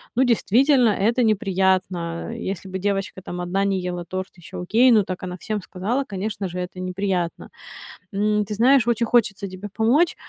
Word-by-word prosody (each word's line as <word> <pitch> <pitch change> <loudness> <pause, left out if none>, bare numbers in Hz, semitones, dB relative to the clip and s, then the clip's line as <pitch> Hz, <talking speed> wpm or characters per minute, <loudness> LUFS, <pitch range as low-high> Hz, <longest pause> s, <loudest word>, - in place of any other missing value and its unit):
ну, 260 - +4
действительно 245 +2 +4
это 225 +5 +1
неприятно. 190 -3 0
Если 195 -4 -5
бы 190 0 -4
девочка 195 -1 -2
там 180 -1 -6
1 180 +3 0
не 195 -1 +1
ела 175 -1 -4
торт, 185 +2 -4
еще 175 - -9
окей, 225 +8 +4
ну 215 -4 +5
так 185 -1 -5
она 180 0 -5
всем 210 +2 -3
сказала, 215 +11 -2
конечно 200 -1 -4
же, 180 0 -7
это 180 0 -6
неприятно. 185 -2 -2 0.6
М, 210 +1 +1
ты 210 - -5
знаешь, 250 +3 +4
очень 235 0 +1
хочется 210 -4 +1
тебе 185 +2 -8
помочь. 260 +10 +3
195 Hz, 175 wpm, -23 LUFS, 185-225 Hz, 0.6 s, ну